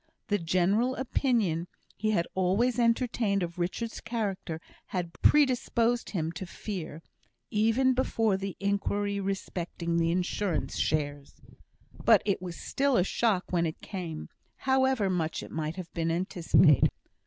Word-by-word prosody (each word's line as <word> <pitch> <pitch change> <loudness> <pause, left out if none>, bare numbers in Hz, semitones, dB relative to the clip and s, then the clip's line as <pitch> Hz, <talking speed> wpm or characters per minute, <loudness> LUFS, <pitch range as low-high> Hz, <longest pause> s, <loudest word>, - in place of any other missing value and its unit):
The 205 -1 +2
general 190 +9 +2
opinion 225 - 0 0.3
he 215 +2 -1
had 170 -6 +2
always 200 +7 +1
entertained 230 -4 +2
of 170 +1 -5
Richard's 225 +6 -3
character 200 -8 -3 0.3
had 175 -3 -3
predisposed 245 -4 +3
him 165 -5 -2
to 175 +3 -7
fear, 170 -5 -6 0.5
even 225 +5 +3
before 225 -5 +1
the 195 0 -4
inquiry 200 0 0
respecting 180 -3 -3
the 165 0 +2
Insurance 180 +1 -1
shares. 145 -2 -1 0.7
But - - +6
it 200 -3 0
was 175 -2 -6
still 275 -2 +1
a - - +4
shock 200 -1 0
when 170 -2 +2
it 160 - -6
came, 170 -6 -6 0.3
however 265 -5 +2
much 170 -4 -1
it - - -10
might 155 0 -3
have 185 -3 -8
been 165 -1 -1
anticipated. 170 -3 +4
190 Hz, 135 wpm, -29 LUFS, 170-225 Hz, 0.7 s, But